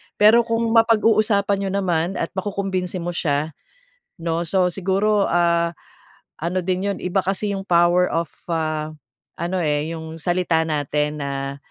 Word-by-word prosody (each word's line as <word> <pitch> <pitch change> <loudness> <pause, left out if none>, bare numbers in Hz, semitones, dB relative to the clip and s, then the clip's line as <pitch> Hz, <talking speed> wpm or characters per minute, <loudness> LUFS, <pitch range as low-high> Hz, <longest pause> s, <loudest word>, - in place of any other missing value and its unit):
Pero 215 +3 +6
kung 230 0 0
mapag-uusapan 215 -3 +3
n'yo 195 - -2
naman 180 -2 0
at - - -3
makukumbinsi 190 -2 -2
mo 175 - -2
siya 155 -2 -1 0.7
'no, 165 +1 -1
so, 180 +2 +2
siguro, 195 +3 +1
ah, 170 -1 +2 0.7
ano 175 +2 -1
din 185 +2 0
'yon, 200 - -2
iba 180 +2 0
kasi 195 +2 -1
yung 195 - -3
power 175 0 +3
of 165 +1 0 0.2
ah, 155 -2 -1 0.5
ano, 175 +2 -1
eh, 150 0 0
yung 160 0 -8
salita 175 -1 +1
natin 150 0 -1
na 140 0 -4
175 Hz, 145 wpm, -22 LUFS, 160-195 Hz, 0.7 s, Pero